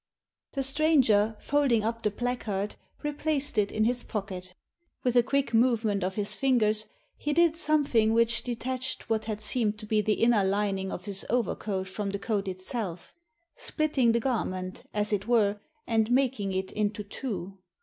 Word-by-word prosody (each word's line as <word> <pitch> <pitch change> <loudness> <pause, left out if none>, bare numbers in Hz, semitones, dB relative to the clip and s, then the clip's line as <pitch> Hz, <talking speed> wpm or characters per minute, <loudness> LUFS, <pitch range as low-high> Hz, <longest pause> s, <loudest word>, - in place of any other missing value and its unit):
The 275 - -1
stranger, 260 -7 +3
folding 275 -6 +2
up 230 +1 -2
the 210 - +1
placard, 210 -3 -2 0.3
replaced 295 -3 0
it 205 -1 +1
in 215 - +1
his 245 +2 +1
pocket 185 -4 -5 0.5
With 250 -1 +1
a 245 - +7
quick 270 0 0
movement 225 -4 +2
of 190 +1 -2
his 205 -1 +1
fingers 220 -5 +2 0.3
he 295 - -2
did 335 0 +4
something 290 -9 +3
which 230 +1 +3
detached 255 0 -4
what 220 -1 +1
had 215 -2 -3
seemed 215 -1 0
to 215 - -8
be 215 0 +2
the 210 +1 +2
inner 230 -3 +3
lining 195 -1 0
of 180 - -6
his 195 -2 -3
overcoat 210 -5 -1
from 200 +1 -3
the 200 - -2
coat 200 -1 -2
itself— 185 -1 -5 0.4
splitting 290 -6 +1
the 235 - +2
garment, 185 -7 -2
as 210 0 0
it 205 +1 -1
were, 210 -4 +3 0.3
and 225 -1 +1
making 245 -6 +1
it 190 0 -2
into 210 0 -1
two. 195 -4 -5
220 Hz, 165 wpm, -28 LUFS, 200-250 Hz, 0.5 s, a